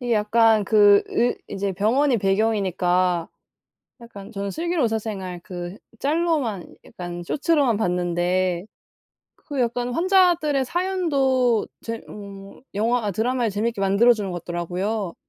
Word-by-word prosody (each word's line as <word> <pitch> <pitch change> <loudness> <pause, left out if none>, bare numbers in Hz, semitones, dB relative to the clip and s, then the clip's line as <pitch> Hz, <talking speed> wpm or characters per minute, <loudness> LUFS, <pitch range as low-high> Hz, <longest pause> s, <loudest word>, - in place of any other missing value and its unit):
이게 245 -1 -2
약간 220 0 +3
그 205 -1 +5
의 245 +1 0
인제 200 0 -3
병원이 240 +7 +2
배경이니까 185 -4 +1 0.7
약간 205 -4 -11
저는 200 -1 -4
슬기로운 335 - -1
의사 225 -1 +1
생활 190 -5 -6
그 175 -1 -7 0.2
짤로만 290 - -1
약간 175 -1 -7
쇼츠로만 280 - +1
봤는데 180 -1 0 0.7
그 285 -4 -5
약간 245 +1 -1
환자들의 345 -5 +3
사연도 275 - +1 0.2
재 230 0 -5
어 200 -1 -10 0.2
영화나 225 0 0
드라마를 235 +3 0
재밌게 210 +2 -2
만들어 200 +5 +5
주는 205 -4 -3
것 175 -1 -6
같더라고요. 180 +3 -3
215 Hz, 290 characters per minute, -23 LUFS, 190-250 Hz, 0.7 s, 그